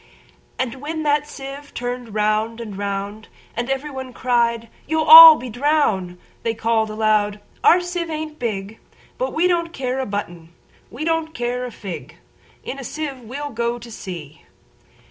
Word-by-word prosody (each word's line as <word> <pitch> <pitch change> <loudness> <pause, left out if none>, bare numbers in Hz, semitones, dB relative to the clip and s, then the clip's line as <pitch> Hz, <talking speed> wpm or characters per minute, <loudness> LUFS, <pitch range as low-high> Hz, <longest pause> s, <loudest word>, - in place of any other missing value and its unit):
And 260 0 -3
when 315 +2 -4
the 295 0 +2
sieve 280 0 -9
turn'd 245 -2 -5
round 215 +2 0
and 215 -4 -7
round, 200 +2 -4 0.3
And 240 +2 -3
every 270 +2 -2
one 260 -2 -7
cried, 235 -2 0 0.2
"You 320 0 +1
'll 320 0 +12
be 250 - -7
drown'd!"They 230 -6 -1
call'd 225 -1 0
aloud, 215 -1 +1 0.2
"Our 355 - +6
sieve 350 -1 -4
ain't 310 -1 -5
big:But 225 - -6
we 325 +3 +1
don't 340 -2 +1
care 260 -4 -3
a 265 - -2
button; 175 -5 -6 0.3
we 275 +7 -6
don't 325 -1 -1
care 245 +1 -2
a 250 - -6
fig:In 175 - -10
a - - -7
sieve 285 0 -5
we 245 +5 -8
'll 290 0 -5
go 235 0 -2
to 235 0 -11
sea!" 165 -8 -8
245 Hz, 155 wpm, -21 LUFS, 215-295 Hz, 0.3 s, ll